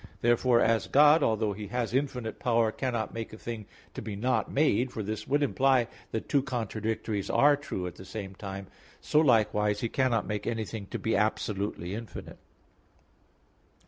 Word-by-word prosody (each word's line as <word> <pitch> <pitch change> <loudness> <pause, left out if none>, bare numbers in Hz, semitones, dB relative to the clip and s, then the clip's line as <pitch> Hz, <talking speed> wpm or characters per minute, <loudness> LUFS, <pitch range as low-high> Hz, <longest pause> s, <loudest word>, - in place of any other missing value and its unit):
Therefore, 120 +1 +4
as 115 -1 +2
God, 150 +3 +6
although 110 -4 +1
He 105 +1 -7
has 120 +2 -2
infinite 125 -4 -2
power, 115 -2 +2
cannot 120 -3 -2
make 115 -1 -5
a - - -8
thing 110 -3 -6 0.3
to - - -6
be 105 - -5
not 125 +6 0
made 135 -3 +2
(for 110 - -4
this 110 +2 -4
would 145 +2 +2
imply 135 -3 +3 0.2
that 110 - -4
two 140 - +3
contradictories 110 -4 -3
are 145 0 +5
true 140 -10 -5
at 90 - -5
the - - -10
same 95 0 -7
time), 95 0 -7 0.3
so 150 - +2
likewise 105 -6 +3
He 115 - -1
cannot 125 -4 +1
make 105 -1 -3
anything 110 -2 -3
to - - -4
be 115 - 0
absolutely 100 -3 -1
infinite. 115 +1 -8
115 Hz, 170 wpm, -29 LUFS, 105-125 Hz, 0.3 s, God